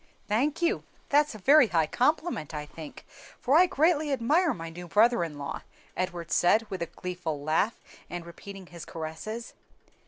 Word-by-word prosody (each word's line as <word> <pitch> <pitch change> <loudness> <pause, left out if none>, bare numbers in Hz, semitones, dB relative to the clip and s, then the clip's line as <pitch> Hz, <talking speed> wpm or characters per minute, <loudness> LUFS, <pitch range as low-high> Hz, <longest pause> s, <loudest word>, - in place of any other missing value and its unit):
"Thank 280 +10 0
you; 345 +5 +1 0.3
that's 290 -3 +3
a - - -6
very 270 +5 +6
high 165 -5 +2
compliment, 255 - 0
I 150 0 -4
think; 155 0 -11 0.3
for 270 - +2
I 360 +3 +7
greatly 315 -3 +2
admire 300 +7 +2
my 165 -1 -6
new 175 +1 -9
brother 225 +3 +4
in 155 -3 -5
law," 140 -1 -5 0.3
Edward 175 -2 -3
said, 215 +6 +4
with 190 - -4
a 170 - -1
gleeful 180 -5 -5
laugh, 160 +9 +1 0.3
and 175 -1 -6
repeating 195 +3 -10
his 170 -1 -10
caresses. 165 +9 -6
195 Hz, 165 wpm, -28 LUFS, -, 0.3 s, I